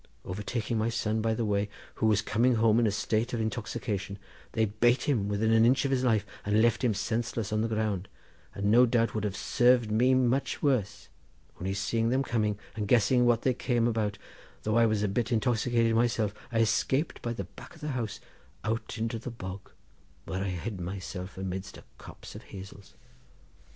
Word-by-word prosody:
Overtaking 110 +4 -2
my 110 +1 +1
son 110 -1 -1
by 110 0 +1
the 115 - -1
way, 100 0 0 0.2
who 110 - 0
was 105 -1 +3
coming 120 +4 +2
home 115 0 +4
in 115 - +3
a - - +1
state 110 +3 -1
of 120 - -1
intoxication, 110 -3 -3 0.4
they 110 -1 +2
bate 115 +4 +2
him 115 -9 +1
within 105 +2 +1
an 110 0 +5
inch 130 +4 +4
of 135 - 0
his 130 -1 +1
life, 110 -5 +2 0.2
and 105 +1 +2
left 115 +2 +3
him 115 -4 +2
senseless 110 +1 -2
on 110 - +1
the 115 - +1
ground, 110 -4 -1 0.5
and 100 +1 0
no 125 +2 +7
doubt 115 -1 +1
would 110 - -2
have 100 -2 -2
served 120 -1 +3
me 125 +4 +4
much 130 +1 +1
worse, 110 -8 0 0.5
only 95 +2 -2
seeing 115 +3 0
them 130 +2 +2
coming, 105 -5 0 0.2
and 105 -2 -3
guessing 125 +2 +4
what 120 -1 +3
they 130 - +3
came 120 -2 +1
about, 110 -3 -1 0.5
though 110 0 0
I 115 0 +5
was 110 -1 0
a - - +2
bit 115 +4 -1
intoxicated 115 0 +2
myself, 115 -3 +1 0.2
I 115 -1 +2
escaped 130 +7 +1
by 120 - -2
the 100 - -4
back 95 - -13
of 165 - -17
the 150 - -3
house 120 -6 -3 0.4
out 115 +3 -3
into 115 +1 -2
the 120 - -6
bog, 95 -4 -8 0.6
where 95 +3 -3
I 100 - -2
hid 95 +2 -4
myself 95 +1 -6
amidst 95 +1 -5
a - - -13 0.2
copse - - -11
of - - -9
hazels. 95 +1 -11
110 Hz, 195 wpm, -29 LUFS, 105-120 Hz, 0.6 s, no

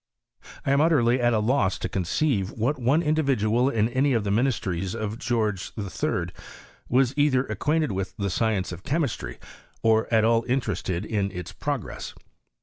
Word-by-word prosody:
I - - +1
am 140 +1 +4
utterly 130 -6 +3
at 120 0 +3
a 115 - +2
loss 105 -3 +1
to - - -3
conceive 95 - 0
what 130 +6 -1
one 135 +7 +2
Individual 135 -6 +2
in 110 -4 +1
any 130 +3 +1
of 115 -3 +1
the 100 - -1
ministries 100 -6 0
of 110 +1 -4
George 110 -5 -1
III, 90 -3 -2 0.6
was 130 0 +3
either 140 -3 +3
acquainted 150 +6 0
with 95 +2 -4
the 100 -3 -1
science 105 -2 0
of 90 0 -7
chemistry, 145 - -2 0.5
or 110 0 +3
at 110 -1 +4
all 115 0 +3
interested 120 -8 -1
ia 105 -3 0
its 90 -2 -6
progress. 140 +3 -4
115 Hz, 160 wpm, -25 LUFS, 100-135 Hz, 0.6 s, am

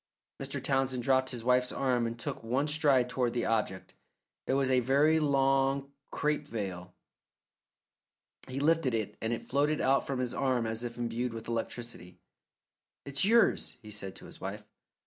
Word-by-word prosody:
Mr. - - -3
Townsend 135 -2 0
dropped 130 0 +2
his 120 -3 -4
wife's 125 +1 +3
arm 125 -3 +1
and 115 0 -5
took 115 - -5
one 130 +6 0
stride 145 -5 +3
toward 125 -1 -1
the 120 - -1
object. 105 -4 -1 0.5
It - - +1
was 135 -1 +2
a 130 - +5
very 140 +6 +3
long 135 -1 +2 0.2
crape 150 0 -1
veil. 95 -7 -5 1.5
He 130 +1 -4
lifted 150 -4 +2
it, 110 -3 -3
and 115 - -1
it 120 - -3
floated 145 +3 +1
out 135 +1 +2
from 135 - -2
his 125 -1 -1
arm 130 -4 +1
as 110 +1 -2
if 120 0 -5
imbued 120 0 -2
with 115 - -7
electricity. 115 -5 -4 0.9
"It's 140 0 0
yours," 230 - +3
he 105 - -10
said 100 -2 -4
to - - -11
his - - -11
wife. 100 +2 -5
125 Hz, 165 wpm, -30 LUFS, 115-140 Hz, 1.5 s, a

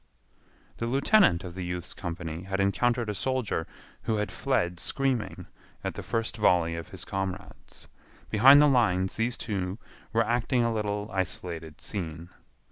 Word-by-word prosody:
The 115 - -2
lieutenant 135 - +4
of 90 -2 -7
the 90 0 -5
youth's 90 0 -5
company 85 -2 -5
had 95 +1 -3
encountered 120 +4 +2
a 105 - -1
soldier 125 -6 -1 0.3
who 110 - 0
had 105 -2 -1
fled 85 0 0
screaming 135 +1 -1 0.4
at - - -2
the - - -6
first 115 -1 -2
volley 85 -5 +3
of 85 - -7
his - - -8
comrades. 95 0 -6 0.4
Behind 135 +7 +8
the 150 - +7
lines 100 -9 +2
these 120 +2 0
two 95 -3 -3 0.3
were 115 0 +2
acting 120 +2 +1
a 115 -1 +1
little 105 -1 -2
isolated 85 -4 -4
scene. 85 -4 -5
100 Hz, 150 wpm, -28 LUFS, 90-115 Hz, 0.4 s, Behind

